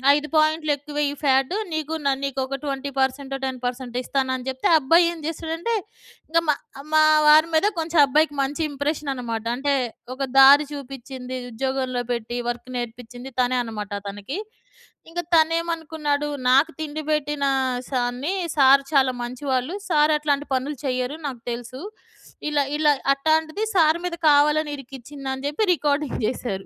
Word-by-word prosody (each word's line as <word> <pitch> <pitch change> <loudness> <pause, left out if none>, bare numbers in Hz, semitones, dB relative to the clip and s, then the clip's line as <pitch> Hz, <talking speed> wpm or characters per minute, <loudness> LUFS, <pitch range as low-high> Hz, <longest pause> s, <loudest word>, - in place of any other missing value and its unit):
"5 295 0 -2
పాయింట్‌లు 310 0 +2
ఎక్కువె‌య్యి 290 0 -2
ఫ్యాటు. 270 +5 +2 0.2
నీకు 315 0 -3
న - - +4
నీకొక 270 0 -2
ట్వెంటీ 280 0 -3
పర్సెంటొ, 270 +1 -1
టెన్ 260 -1 -4
పర్సెంటొ" 245 0 -4
ఇస్తానని 260 -1 -1
జెప్తే 260 0 -1
ఆ - - +8
అబ్బాయేం 335 +4 +4
జేసాడంటే, 330 +7 -2 0.5
ఇంగ 335 +1 +3
మా, 295 - +4 0.4
మా 310 0 +6 0.2
వారి 310 +2 +7
మీద 390 +6 +4
కొంచెం 325 0 0
అబ్బాయికి 295 +2 +2
మంచి 290 +4 -2
ఇంప్రెషన్ననమాట. 270 -6 -3
అంటే 280 +1 +1 0.4
ఒక 275 - -3 0.2
దారి 285 +2 +8
చూపిచ్చింది, 260 -2 -7
ఉద్యోగంలో 255 0 -2
పెట్టి 235 +1 -4
వర్క్ 240 +1 -5
నేర్పిచ్చింది 245 +2 -7
తనే 250 +1 +1
అనమాట 210 -3 -6 0.2
తనకి. 205 - -6 0.7
ఇంగ 350 +1 -5 0.2
తనెమనుకున్నాడు, 320 -2 0 0.2
"నాకు 280 +6 +5
తిండి 310 0 -4
బెట్టిన 295 -1 0 0.4
సార్‌ని, 250 +6 -1 0.2
సార్ 275 0 +7
చాలా 265 -2 +4
మంచివాళ్ళు. 255 +4 -2 0.2
సార్ 305 -1 +4
అట్లాంటి 290 -1 0
పనులు 280 +3 -2
చెయ్యరు. 255 +2 -1
నాకు 250 -4 -7
తెలుసు. 245 +2 -6 0.7
ఇలా 290 -1 +2
ఇలా 300 -1 +4 0.2
అట్టాంటిది 315 +7 0
సార్ 320 -1 +4
మీద 345 -1 -2
కావాలని 295 +1 +3
ఇరికిచ్చింది" 270 +1 -9
అని 265 +1 -6
జెప్పి 300 +9 0
రికార్డింగ్ 290 -2 -1
జేసారు. 200 -6 -3
280 Hz, 140 wpm, -23 LUFS, 255-310 Hz, 0.7 s, ఆ